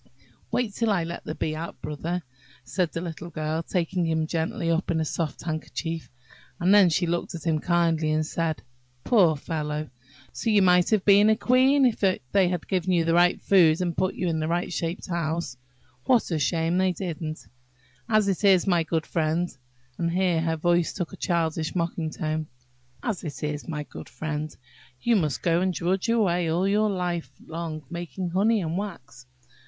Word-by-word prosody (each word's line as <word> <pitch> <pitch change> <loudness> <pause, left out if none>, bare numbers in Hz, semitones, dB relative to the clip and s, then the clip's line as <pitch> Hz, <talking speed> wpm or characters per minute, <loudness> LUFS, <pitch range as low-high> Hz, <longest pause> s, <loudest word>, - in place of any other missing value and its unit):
"Wait 235 -5 -1
till 230 +2 0
I 195 -5 +2
let 170 +1 -6
the 155 - -4
Bee 155 - -2
out, 165 +2 -6
Brother," 165 +4 -4 0.4
said 180 -4 -1
the 165 - -4
little 170 0 -6
Girl, 155 0 -2
taking 180 +1 -1
him 160 -1 +1
gently 165 +3 -1
up 165 +2 0
in 165 - +1
a 160 - 0
soft 155 -1 -3
handkerchief; 160 0 -4 0.5
and 180 +3 +4
then 200 -3 +7
she 175 +2 +1
looked 170 +1 -2
at 165 - -7
him 160 -2 +1
kindly 165 -2 +1
and 155 0 +1
said, 160 -1 -2 0.4
"Poor 180 -9 +4
fellow! 150 0 -4 0.4
so 230 - -2
you 205 -3 +5
might 180 -1 +4
have 215 -4 +2
been 205 +1 +6
a 220 - +5
queen 260 +4 +4
if 240 -3 +1
they 190 -2 +3 0.3
had 175 -2 -1
only - - -20
given 185 -1 0
you 170 -2 +2
the 165 - +2
right 175 +1 +4
food, 170 -5 +5
and 175 -2 -1
put 185 - 0
you 180 - -2
into 160 -2 0
a - - -3
right 175 +1 -1
shaped 165 +4 -3
house! 170 -5 -2 0.5
What 245 -7 +3
a 160 - 0
shame 165 +4 +1
they 185 -1 +2
didn't! 165 -4 -5 0.6
As 215 -2 +3
it 195 +1 -1
is, 190 -3 +5
my 175 -4 +3
good 160 0 -1
friend," 165 +1 -1 0.4
(and 170 - +1
here 175 -1 +1
her 165 0 0
voice 175 +1 +2
took 175 -3 -4
a - - -5
childish 165 -2 -1
mocking 170 -2 -1
tone)–"As 130 - -6
it 145 -5 -6
is, 150 0 -3
my 150 -3 -3
good 135 - -10
friend, 155 -1 -4 0.4
you 235 - +2
must 155 -9 0
go 170 0 +2
and 185 0 +1
drudge 185 +4 -1
away 180 -7 +2
all 175 +4 +1
your 210 +2 +2
life 180 -3 -2 0.2
long, 160 -1 -5
making 175 +1 -4
honey 210 +4 +2
and 165 +1 -2
wax. 130 -11 -8
170 Hz, 190 wpm, -26 LUFS, 160-185 Hz, 0.6 s, then